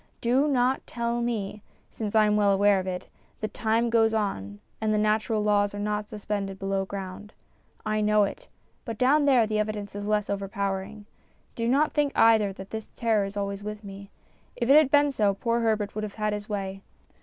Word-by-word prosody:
Do 255 +5 +2
not 260 -2 +1
tell 235 0 -2
me 210 -3 -3 0.3
since 215 -1 -4
I 215 -1 +6
am 210 0 +2
well 205 -1 +3
aware 200 0 +4
of 185 - -5
it 180 -1 -4 0.3
that 215 -1 -4
time 230 +1 +1
goes 225 -1 +3
on 100 - -3 0.2
and 220 -1 +1
the 215 - +2
natural 215 +1 +1
laws 205 -1 +2
are - - -5
not 210 0 -2
suspended 205 -2 -4
below 195 0 -1
ground. 195 +2 -7 0.5
I 215 0 0
know 210 0 +4
it; 200 - -4 0.4
but 230 -4 -6
down 285 +5 +3
there 255 -5 +5
the 215 0 -1
evidence 210 -1 -3
is 205 0 -5
less 210 -1 +1
overpowering. 200 +1 -3 0.5
Do 230 -1 -2
not 280 +5 +3
think 290 -2 +1
either 220 -3 +5
that 190 0 -10
this 220 -1 -6
terror 220 -4 +1
is 195 +1 -7
always 200 0 -3
with 210 +1 -6
me. 200 0 -10 0.5
If 235 - -2
it - - +8
had 305 -3 +6
been 290 0 +4
so, 205 -6 +1
poor 235 +3 0
Herbert 215 -3 0
would 215 - -4
have 210 -2 -6
had 215 -1 -1
his 210 0 -6
way. 195 -2 -4
210 Hz, 200 wpm, -26 LUFS, 200-230 Hz, 0.5 s, it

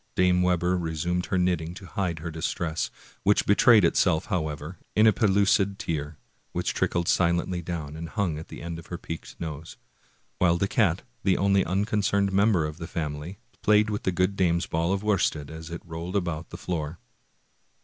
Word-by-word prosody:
Dame 90 -1 +3
Webber 90 0 +2
resumed 85 +2 -2
her 95 - 0
knitting 90 -2 0
to 95 - -10
hide 90 -1 -2
her 85 +2 -5
distress, 80 0 -2 0.3
which 100 +1 +3
betrayed 105 0 +6
itself, 85 -1 +2
however, 80 -4 -3 0.2
in 110 - +5
a 110 - +6
pellucid 100 -1 +3
tear, 75 -6 -3 0.4
which - - -1
trickled 85 -1 0
silently 85 0 +1
down, 80 -4 -5
and 80 +1 -6
hung 90 -8 -1
at 80 - -9
the - - -9
end 85 -1 -5
of 85 - -13
her 85 - -5
peaked 80 -2 -7
nose; 80 -1 -6 0.6
while 85 -2 +4
the 100 - +1
cat, 95 -5 +2 0.2
the 95 -2 +3
only 100 0 +3
unconcerned 100 0 +1
member 100 -4 +3
of 75 0 -5
the 80 - -5
family, 75 +2 -4 0.2
played 105 0 +4
with 105 - -2
the 95 - 0
good 90 +2 +1
dame's 85 -2 +2
ball 85 +2 0
of 100 +1 -1
worsted 80 -8 0
as 80 +1 -8
it 85 +1 -7
rolled 85 +3 -6
about 85 -4 -2
the - - -8
floor. 80 -2 -3
90 Hz, 180 wpm, -26 LUFS, 80-95 Hz, 0.6 s, betrayed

